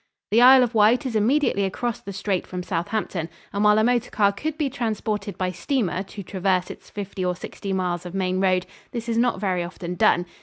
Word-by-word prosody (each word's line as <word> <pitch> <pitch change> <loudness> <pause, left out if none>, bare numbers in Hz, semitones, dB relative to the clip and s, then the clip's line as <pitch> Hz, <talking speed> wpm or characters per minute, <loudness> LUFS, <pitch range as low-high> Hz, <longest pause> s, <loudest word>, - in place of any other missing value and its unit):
The 225 +3 +5
Isle 255 +1 +8
of 245 -1 -1
Wight 225 +5 +4
is 250 -4 -3
immediately 220 -1 +2
across 230 +5 -2
the 200 - -7
strait 195 -1 -2
from 180 -1 -5
Southampton, 175 -1 -2 0.2
and 200 +1 0
while 210 0 +5
a 220 - +4
motor 245 0 +1
car 200 -2 +3
could 305 +10 -4
be 300 -3 0
transported 215 -6 -3
by 185 -1 -1
steamer 185 0 -1
to 200 +1 -8
traverse 185 -1 0
its - - -13
fifty 200 -2 -5
or 180 0 0
sixty 195 +3 -7
miles 180 -2 -1
of 180 +1 -8
main 185 -1 0
road, 185 -1 +2 0.3
this 235 -1 -4
is 230 0 +1
not 240 -5 +1
very 185 -3 0
often 175 0 -6
done. 175 0 +3
200 Hz, 215 wpm, -24 LUFS, 185-230 Hz, 0.3 s, Isle